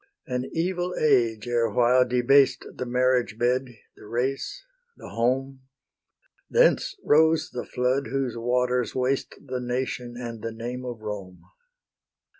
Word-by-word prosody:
An 125 0 -3
evil 180 +1 -1
age 120 -7 +2
erewhile 120 +2 +3
debased 130 +3 +3
The 125 - -5
marriage 125 -4 +1
bed, 125 +2 +1 0.3
the - - -14
race, 135 - -2 0.3
the - - -10
home; 130 +3 -1 0.9
Thence - - +3
rose 160 +2 +4
the 125 - -5
flood 125 +2 0
whose 130 -1 -2
waters 125 0 0
waste 130 +1 -1
The 130 -2 -3
nation 125 -1 -3
and 115 -2 -6
the 115 - -4
name 120 +3 -6
of 120 -3 -6
Rome. 100 -4 -7
125 Hz, 125 wpm, -25 LUFS, 120-135 Hz, 0.9 s, rose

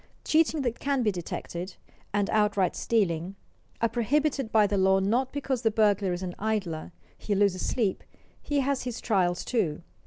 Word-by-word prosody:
Cheating 315 -2 +2
that 240 -2 -2
can 275 -3 0
be 215 - +2
detected, 175 0 -6 0.4
and 205 -1 +1
outright 210 -3 +2
stealing, 190 -5 0 0.5
are 230 - +4
prohibited 265 +2 0
by 215 -2 +5
the 205 - 0
law 190 0 +4
not 235 +7 +1
because 270 -3 -2
the 225 - +3
burglar 205 -3 +2
is 175 +1 -3
an 180 -1 -4
idler; 195 -7 -2 0.3
he 205 - -1
loses 195 -2 +2
sleep; 215 -7 0 0.4
he 290 -1 0
has 275 0 0
his 245 -2 -4
trials 180 -6 +1
too. 175 -10 -1
210 Hz, 165 wpm, -27 LUFS, 190-245 Hz, 0.5 s, by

